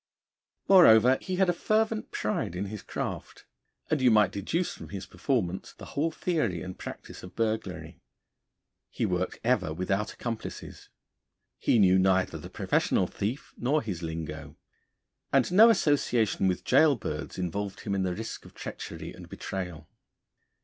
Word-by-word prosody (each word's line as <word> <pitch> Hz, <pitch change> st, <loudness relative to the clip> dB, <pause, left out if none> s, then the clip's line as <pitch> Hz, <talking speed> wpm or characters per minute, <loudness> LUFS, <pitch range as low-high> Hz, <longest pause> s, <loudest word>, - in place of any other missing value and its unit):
Moreover, 130 Hz, -, +7 dB
he 185 Hz, -, -3 dB
had 190 Hz, 0 st, +3 dB
a 175 Hz, -, +3 dB
fervent 215 Hz, +4 st, 0 dB
pride 105 Hz, -4 st, -2 dB
in 95 Hz, +3 st, -2 dB
his 105 Hz, -, -6 dB
craft; -, -, -6 dB, 0.5 s
and 155 Hz, -3 st, +2 dB
you 130 Hz, -, +6 dB
might 105 Hz, -2 st, +4 dB
deduce 165 Hz, -, -2 dB
from -, -, -10 dB
his 100 Hz, -1 st, -6 dB
performance 95 Hz, -1 st, -2 dB
the -, -, -11 dB
whole 155 Hz, +4 st, +1 dB
theory 155 Hz, -, -1 dB
and 90 Hz, 0 st, -7 dB
practice -, -, -8 dB
of 90 Hz, -, -11 dB
burglary. 110 Hz, -1 st, -3 dB, 0.9 s
He -, -, -2 dB
worked -, -, -1 dB
ever 75 Hz, -, +1 dB
without 95 Hz, +5 st, -1 dB
accomplices. 115 Hz, -2 st, -7 dB, 0.7 s
He -, -, +3 dB
knew 95 Hz, -3 st, +5 dB
neither 95 Hz, 0 st, +2 dB
the -, -, -9 dB
professional -, -, +1 dB
thief 115 Hz, +8 st, -4 dB
nor 145 Hz, +5 st, +1 dB
his 95 Hz, -6 st, -4 dB
lingo; 80 Hz, -2 st, -6 dB, 0.8 s
and 135 Hz, +4 st, +3 dB
no 215 Hz, +5 st, +8 dB
association 135 Hz, -, +2 dB
with 90 Hz, -2 st, -1 dB
gaol 155 Hz, -3 st, +5 dB
birds 80 Hz, -8 st, -5 dB
involved 95 Hz, +2 st, -3 dB
him 100 Hz, -, -3 dB
in 95 Hz, -, 0 dB
the 90 Hz, -1 st, -1 dB
risk 110 Hz, +3 st, -6 dB
of -, -, -15 dB
treachery -, -, -7 dB
and -, -, -12 dB
betrayal. 90 Hz, -5 st, -6 dB
105 Hz, 150 wpm, -28 LUFS, 90-140 Hz, 0.9 s, no